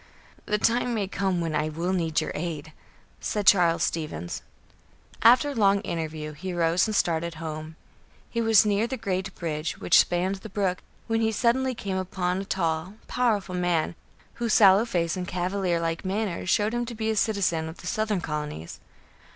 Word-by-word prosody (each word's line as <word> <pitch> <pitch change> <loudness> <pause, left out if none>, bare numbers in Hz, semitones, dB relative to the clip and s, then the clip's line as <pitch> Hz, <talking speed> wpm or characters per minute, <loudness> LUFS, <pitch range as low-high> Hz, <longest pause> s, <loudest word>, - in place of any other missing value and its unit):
"The 210 - +1
time 235 +2 +1
may 205 -3 -1
come 190 -2 -1
when 165 -2 -2
I 155 0 0
will 170 +4 -2
need 165 -4 +1
your - - -3
aid," 155 -1 -5 0.5
said 210 -2 -2
Charles 175 -4 +5
Stevens. 150 - -3 0.8
After 255 +5 +6
a - - -4
long 200 -4 +3
interview, 155 -4 -4
he 185 +5 -5
rose 170 +3 +2
and 215 - -2
started 170 -2 0
home. 155 0 -6 0.5
He 230 - -2
was 225 -2 +5
near 210 +2 +2
the 265 - -4
great 190 -3 -3
bridge 155 -2 -3
which - - +5
spanned 180 +3 +1
the 205 +3 -10
brook, 190 -2 -1 0.2
when 225 0 0
he 220 0 +2
suddenly 250 +4 +1
came 195 -4 -3
upon 185 0 -1
a - - -7
tall, 170 0 -1
powerful 215 -7 0
man, 175 -2 0 0.5
whose 230 -2 +2
sallow 200 +1 +7
face 170 -7 -1
and 180 -1 -4
cavalier 180 -1 -1
like 165 0 -2
manner 195 -2 -2
showed 210 +3 +2
him 240 0 -1
to 235 - -6
be 220 0 -1
a - - -1
citizen 190 -7 +1
of 160 - -10
the - - -12
southern 215 -3 -1
colonies. 150 - -5
185 Hz, 180 wpm, -26 LUFS, 165-215 Hz, 0.8 s, sallow